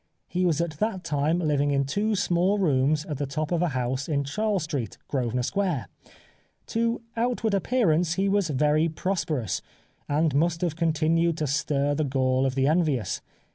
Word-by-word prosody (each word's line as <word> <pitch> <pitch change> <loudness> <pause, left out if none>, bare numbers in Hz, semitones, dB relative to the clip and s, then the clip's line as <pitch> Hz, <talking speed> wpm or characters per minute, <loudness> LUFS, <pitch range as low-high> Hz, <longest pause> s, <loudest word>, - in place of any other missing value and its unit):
He 180 +1 0
was 160 -3 +1
at 155 -3 -4
that 210 -4 -1
time 150 +2 +1
living 145 -4 +1
in 140 -1 +1
two 210 +10 0
small 185 +1 +2
rooms 150 -4 +2
at 150 -3 -5
the 145 - -1
top 155 +4 -3
of 175 -1 +1
a 175 - +2
house 130 -1 -2
in 140 -2 +1
Charles 200 +5 -1
Street, 140 -7 -4
Grosvenor 125 -2 -1
Square. 180 - -1 0.8
To 230 +1 0
outward 230 -2 0
appearance 180 -6 +2
he 195 +1 +1
was 200 -3 +1
very 150 +3 +2
prosperous, 155 - -2 0.5
and 150 +1 +2
must 165 +4 +1
have 170 -4 0
continued 165 0 +1
to 155 - -1
stir 145 0 0
the 155 +2 0
gall 130 -1 +1
of 130 - -3
the 135 -1 +2
envious. 150 -6 +1
155 Hz, 175 wpm, -26 LUFS, 140-180 Hz, 0.8 s, small